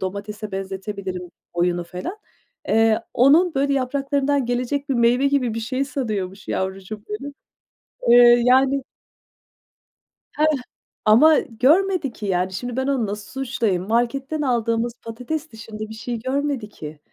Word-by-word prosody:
domatese 205 +2 -5
benzetebilirim 190 -1 -5 0.2
oyunu 175 0 0
falan. 180 - -6 0.5
Eee, 225 0 +3
onun, 315 +8 +5
böyle, 280 +1 +1
yapraklarından 275 0 0
gelecek 250 +4 -2
bir 270 - +1
meyve 240 +3 +3
gibi 255 -5 0
bir 230 - -3
şey 255 +4 -1
sanıyormuş 215 -8 -4
yavrucuğum 195 +2 -4
benim. 275 +7 -5 0.8
Eee, 240 0 +7
yani 265 +2 +4 1.6
Hıh. 305 - +4 0.6
Ama 295 +9 +6
görmedi 300 - +2
ki, 215 - -7
yani, 185 -1 0
şimdi 245 +5 -4
ben 265 +1 0
onu 270 -5 +1
nasıl 205 +1 -6
suçlayayım? 230 -8 -1
Marketten 270 +7 0
aldığımız 235 -3 0
patates 255 +8 -5
dışında 220 -1 -10
bir - - -7
şey 235 +1 -5
görmedi 265 -2 -2
ki, 155 -6 -9
240 Hz, 130 wpm, -22 LUFS, 210-275 Hz, 1.6 s, Eee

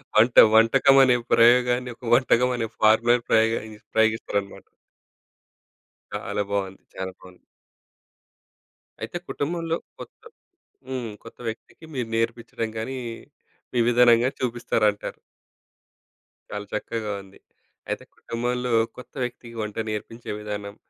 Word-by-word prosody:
వంట. 115 +3 +5 0.2
వంటకం 130 +5 +6
అనే 125 -2 +5 0.2
ప్రయోగాన్ని, 125 +1 +4
ఒక - - -26
వంటకం 125 0 +4
అనే 115 - -1
ఫార్ములా 110 +2 +5 0.2
ప్రయోగిస్ 110 -1 +1
ప్రయోగిస్తారనమాట. 110 -3 0 1.5
చాలా 105 - -2
బావుంది. 95 -1 -2
చాలా 95 0 -4
బావుంది. 90 -1 -16 1.6
అయితే - - -4
కుటుంబంలో, 165 +2 -2 0.2
కొత్త - - -11 0.7
హ్మ్. 125 -4 -4
కొత్త 115 - -13
వ్యక్తికి 115 +8 -9
మీరు 125 -4 -2
నేర్పించడం 115 0 -2
గాని, 130 +4 -4 0.7
మీ 125 - -1
విధానం 120 -1 +6
గాని 130 - 0
చూపిస్తారంటారు. 115 -4 0 1.3
చాలా 105 0 -5
చక్కగా 110 0 -3
ఉంది. 95 0 -18 0.5
అయితే - - -3
కుటుంబంలో 125 +1 -3 0.3
కొత్త 125 - -12
వ్యక్తికి 120 -1 -7
వంట 105 0 -5
నేర్పించే 115 +2 -6
విధానం. 105 -1 -6
115 Hz, 105 wpm, -24 LUFS, 110-125 Hz, 1.6 s, వంటకం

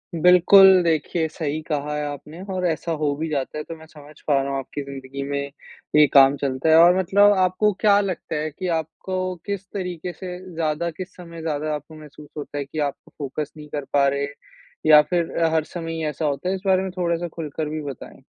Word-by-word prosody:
बिल्कुल, 180 +2 +7
देखिए 160 0 0
सही 155 -1 -3
कहा 150 -1 -3
है 150 - -2
आपने 150 +4 -8
और 180 -1 -1
ऐसा 165 +1 -2
हो 145 -2 +1
भी 160 +2 -3
जाता 140 0 -3
है, 150 - -4
तो 165 - -8
मैं 160 0 -14
समझ 150 -1 -15
पा 140 -2 +3
रहा 140 - -3
हूँ, 135 - -1
आपकी 145 +2 -6
ज़िंदगी 135 0 -7
में 140 0 -1 0.6
ये 150 0 +8
काम 135 0 +7
चलता 135 +3 -1
है। 160 - +7
और 175 +1 +6
मतलब 200 +3 +5
आपको 185 +3 +2
क्या 205 -2 +5
लगता 185 -4 -4
है 155 +1 -2
कि 185 +5 -5
आपको 185 +4 -4
किस 200 -2 -4
तरीक़े 180 -2 -4
से 180 -2 -7 0.2
ज़्यादा 160 +1 -1
किस 185 +3 -9
समय 170 -2 -10
ज़्यादा 155 -1 -2
आपको 155 +2 -9
महसूस 150 0 -13
होता 145 0 -6
है, 140 - -2
कि 155 +3 -6
आप 145 -2 0 0.2
फ़ोकस 145 +1 -4
नहीं 150 0 -10
कर 145 -2 -4
पा 140 -1 +4
रहे 140 +1 0 0.6
या 150 -1 +9
फिर 170 -2 -1 0.2
हर 160 -1 +2
समय 165 0 -6
ही 160 -1 -4
ऐसा 150 +1 -3
होता 145 +5 -1
है? 190 - 0
इस 185 - -7
बारे 190 -1 +3
में 190 - -4
थोड़ा 170 -1 +1
सा 175 0 -4
खुलकर 155 -1 -5
भी 155 0 -4
बताएँ। 140 -3 -9
160 Hz, 220 wpm, -23 LUFS, 145-180 Hz, 0.6 s, या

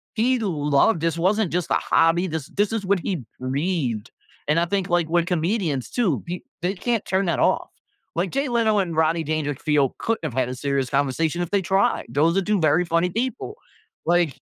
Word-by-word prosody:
he 245 +3 +2
loved. 155 -2 +2
This 165 0 0
wasn't 195 +2 +1
just 180 -2 -1
a - - +4
hobby, 170 +3 +2
this 160 -4 -4
this 205 +1 0
is 215 -3 -2
what 195 -1 +2
he 175 -9 -3 0.2
breathed." 130 - -2 0.4
And 155 - +3
I 170 - +2
think, 190 +1 -1
like, 175 -2 +2
when 170 0 +2
comedians 170 - -1
too, 200 - 0 0.4
they 180 +3 -1
can't 230 +2 -1
turn 190 +1 +1
that 170 - 0
off. - - +1 0.5
Like, 175 +2 -1
Jay 275 0 -1
Leno 225 -3 +2
and 170 -4 -1
Roddy 160 +1 +2
Dandrickfield 145 -2 0
couldn't 225 -5 -1
have 150 - -3
had 125 -1 +1
a 130 - -4
serious 135 0 -1
conversation 145 +5 0
if 175 - -6
they 200 -1 +2
tried! 195 +1 +1
Those 160 +5 +2
are - - +3
2 210 +1 +1
very 155 +3 +3
funny 170 +2 +1
people, 255 - -3 0.5
like 170 -5 +2
170 Hz, 195 wpm, -23 LUFS, 150-195 Hz, 0.5 s, a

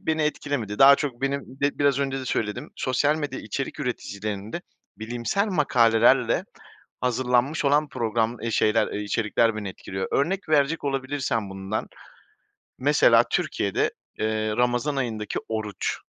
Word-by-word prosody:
beni 160 -1 0
etkilemedi. 140 -8 -2
Daha 140 +1 +9
çok 135 -4 -4
benim, 140 +1 0 0.2
be 140 0 0
biraz 140 -1 +3
önce 135 -1 -1
de - - -6
söyledim, 120 +4 -2
sosyal 145 +4 +1
medya 145 -4 -4
içerik 135 +7 -4
üreticilerinde 110 - -4 0.4
bilimsel 120 - -1
makalelerle 120 - +3 0.6
hazırlanmış 125 +4 +1
olan 145 +2 +3
program, 115 -1 -1
eee, 115 - -2
şeyler, 110 0 +2
eee, 105 - -3
içerikler 110 +1 +1
beni 105 -2 -4
etkiliyor. 95 +1 -5
Örnek 180 +6 0
verecek 150 +1 +2
olabilirsem 130 -6 -2
bundan 95 +2 -4 0.9
mesela - - +5
Türkiye'de, - - 0 0.3
eee, 110 0 -1
Ramazan 125 +4 +1
ayındaki 110 -5 -2
oruç. 110 -2 -3
125 Hz, 130 wpm, -25 LUFS, 110-140 Hz, 0.9 s, Daha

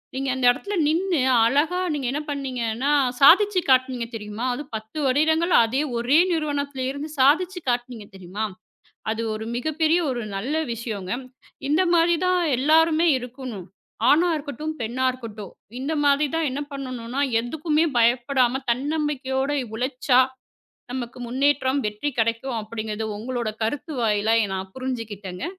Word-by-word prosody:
நீங்க 270 0 -2
அந்த 255 -1 -1
இடத்துல 405 +11 -4
நின்னு 345 +3 +1 0.3
அழகா 300 +9 +2
நீங்க 280 -3 -3
என்ன 295 - -2
பண்ணீங்கன்னா 260 -2 -2 0.3
சாதிச்சு 380 +7 +6
காட்டுனீங்க 255 -2 +3
தெரியுமா? 215 +2 -5
அது 290 - -5
10 220 +6 -7
வருடங்கள். 315 +6 +2
அதே 255 +5 0 0.2
ஒரே 245 +5 +3
நிறுவனத்தில் 285 -4 -2
இருந்து 285 +3 -5
சாதிச்சு 355 +7 +3
காட்டுனீங்க 240 -3 -2
தெரியுமா? 190 +3 -5 0.7
அது 225 +1 -2
ஒரு 220 +1 -5
மிகப்பெரிய 315 +6 +1
ஒரு 245 -2 -2
நல்ல 255 +10 -2 0.2
விஷயம்ங்க. 215 -5 -4 0.5
இந்த 305 +5 +3
மாரிதான் 345 +2 +3 0.2
எல்லாருமே 320 +4 +4
இருக்கணும். 250 -6 -7 0.4
ஆணா 340 +4 +5
இருக்கட்டும், 300 +2 -5
பெண்ணா 245 +4 -1
இருக்கட்டும். 220 -6 -9 0.3
இந்த 310 +3 -2
மாரிதான் 295 +2 +2
என்ன 285 +3 -3
பண்ணணுன்னா 255 -1 -4 0.2
எதுக்குமே 305 +6 0
பயப்படாம 245 +2 +2
தன்னம்பிக்கையோட 275 0 -1 0.2
உழைச்சா 255 +1 +2 0.7
நமக்கு 250 -1 -5
முன்னேற்றம், 270 +2 +1
வெற்றி 210 +8 -4
கிடைக்கும் 230 +2 -1
அப்பிடிங்கிறது 215 0 -4
உங்களோட 235 -1 -3
கருத்து 290 +6 -3
வாயிலா 220 +1 +2 0.2
நான் 190 0 -5
புரிஞ்சுக்கிட்டேங்க. 225 - -5
260 Hz, 125 wpm, -24 LUFS, 230-300 Hz, 0.7 s, சாதிச்சு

